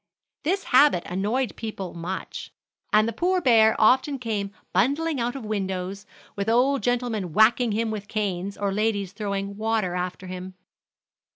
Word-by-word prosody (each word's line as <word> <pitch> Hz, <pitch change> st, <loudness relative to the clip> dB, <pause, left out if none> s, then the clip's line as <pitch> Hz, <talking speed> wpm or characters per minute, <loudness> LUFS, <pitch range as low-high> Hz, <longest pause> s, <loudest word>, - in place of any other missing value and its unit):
This 380 Hz, +6 st, 0 dB
habit 260 Hz, -8 st, +4 dB
annoyed 210 Hz, +6 st, -1 dB
people 205 Hz, -5 st, -6 dB
much, 175 Hz, +3 st, -6 dB, 0.4 s
and 215 Hz, +1 st, +4 dB
the 230 Hz, -, -2 dB
poor 365 Hz, -, +1 dB
bear 225 Hz, -7 st, +5 dB
often 260 Hz, +5 st, +4 dB
came 215 Hz, -5 st, -3 dB, 0.2 s
bundling 285 Hz, -, +1 dB
out 240 Hz, +2 st, -1 dB
of 265 Hz, -5 st, -6 dB
windows, 195 Hz, -1 st, -3 dB, 0.3 s
with 200 Hz, +2 st, -2 dB
old 255 Hz, +4 st, +3 dB
gentlemen 235 Hz, -8 st, -1 dB
whacking 225 Hz, +3 st, +4 dB
him 225 Hz, +1 st, 0 dB
with 205 Hz, -2 st, -5 dB
canes, 200 Hz, -3 st, -3 dB
or 200 Hz, -1 st, -1 dB
ladies 205 Hz, -2 st, 0 dB
throwing 200 Hz, -1 st, -4 dB
water 220 Hz, -4 st, 0 dB
after 180 Hz, +1 st, -4 dB
him. 185 Hz, 0 st, -7 dB
215 Hz, 150 wpm, -25 LUFS, 195-245 Hz, 0.4 s, bear